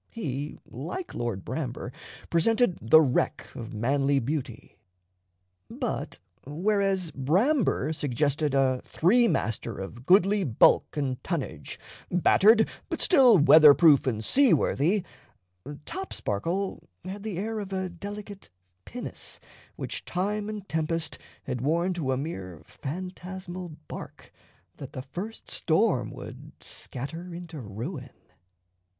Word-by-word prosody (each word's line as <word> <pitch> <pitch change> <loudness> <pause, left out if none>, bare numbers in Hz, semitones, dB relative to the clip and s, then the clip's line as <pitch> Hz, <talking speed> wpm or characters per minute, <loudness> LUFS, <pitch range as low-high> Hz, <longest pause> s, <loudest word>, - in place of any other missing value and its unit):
He, 145 - -4
like 165 - -6
Lord 115 -6 -3
Bramber, - - -4 0.4
presented 220 +3 +2
the 120 +8 +7
wreck 135 -5 0
of 115 +1 -7
manly 135 +5 +1
beauty; 130 -3 -4 0.9
but - - -4 0.3
whereas 190 +3 0
Bramber 175 - +1
suggested 145 +1 0
a 130 -2 +2
three 235 +8 +3
master 115 - -2
of 120 +6 -8
goodly 195 +2 +5
bulk 130 +1 +3
and 130 -3 -2
tonnage, - - -4 0.3
battered 215 +5 +5 0.2
but - - -3
still 260 - +6
weather 150 -1 +8
proof 150 -6 +5
and 110 -3 -1
seaworthy, 205 - +3 0.8
Topsparkle 190 - -3 0.2
had 195 +2 -6
the 205 -4 -4
air 220 +3 -2
of 200 -2 -6
a 190 -1 -1
delicate 200 - -8 0.4
pinnace 245 +1 -8 0.4
which - - -5
time 205 +3 -2
and 210 -2 -6
tempest 160 -1 -2 0.2
had 125 - -4
worn 170 +6 +1
to 155 -7 -2
a 130 - +1
mere 95 - -6
phantasmal 180 +1 -7
bark - - -9 0.5
that - - -9
the 130 - -5
first 185 +11 -7
storm 160 - +1
would - - -10
scatter 165 +7 -6
into 170 -3 -8
ruin. 125 - -6
165 Hz, 115 wpm, -27 LUFS, 135-195 Hz, 0.9 s, weather